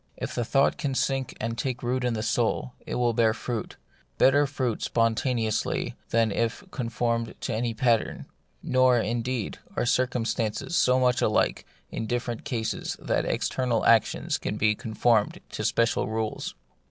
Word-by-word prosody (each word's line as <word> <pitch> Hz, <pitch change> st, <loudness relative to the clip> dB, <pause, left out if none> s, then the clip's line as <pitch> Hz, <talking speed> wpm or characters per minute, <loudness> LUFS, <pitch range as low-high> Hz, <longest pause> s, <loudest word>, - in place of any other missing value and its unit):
If -, -, -4 dB
the 120 Hz, -, -1 dB
thought 135 Hz, +4 st, +2 dB
can 135 Hz, -2 st, -1 dB
sink 135 Hz, -1 st, -1 dB
and 115 Hz, +1 st, -2 dB
take 125 Hz, +2 st, -3 dB
root 125 Hz, +1 st, 0 dB
in 120 Hz, -2 st, 0 dB
the 110 Hz, -, -2 dB
soul, 120 Hz, +2 st, 0 dB
it -, -, -3 dB
will 120 Hz, -1 st, +2 dB
bear 110 Hz, -1 st, +3 dB
fruit, 120 Hz, -3 st, -4 dB, 0.4 s
better 145 Hz, +2 st, +5 dB
fruit 130 Hz, -5 st, -2 dB
spontaneously 115 Hz, -1 st, 0 dB
than 115 Hz, -1 st, +2 dB
if 115 Hz, -, -1 dB
conformed 115 Hz, -2 st, -1 dB
to -, -, -2 dB
any 115 Hz, +1 st, -1 dB
pattern. 115 Hz, -1 st, +1 dB, 0.4 s
Nor, 130 Hz, -1 st, +4 dB
indeed, 120 Hz, 0 st, -2 dB, 0.2 s
are -, -, 0 dB
circumstances 125 Hz, +3 st, 0 dB
so 130 Hz, -4 st, +4 dB
much 125 Hz, 0 st, +2 dB
alike 110 Hz, -, +1 dB, 0.2 s
in 110 Hz, -, -3 dB
different 120 Hz, +1 st, -3 dB
cases 120 Hz, -6 st, -2 dB
that -, -, 0 dB
external 125 Hz, -3 st, 0 dB
actions 115 Hz, -2 st, +3 dB
can -, -, -3 dB
be 105 Hz, 0 st, +3 dB
conformed 110 Hz, 0 st, +1 dB
to -, -, -5 dB
special 115 Hz, 0 st, +1 dB
rules. 110 Hz, 0 st, -3 dB
120 Hz, 155 wpm, -27 LUFS, 115-125 Hz, 0.4 s, better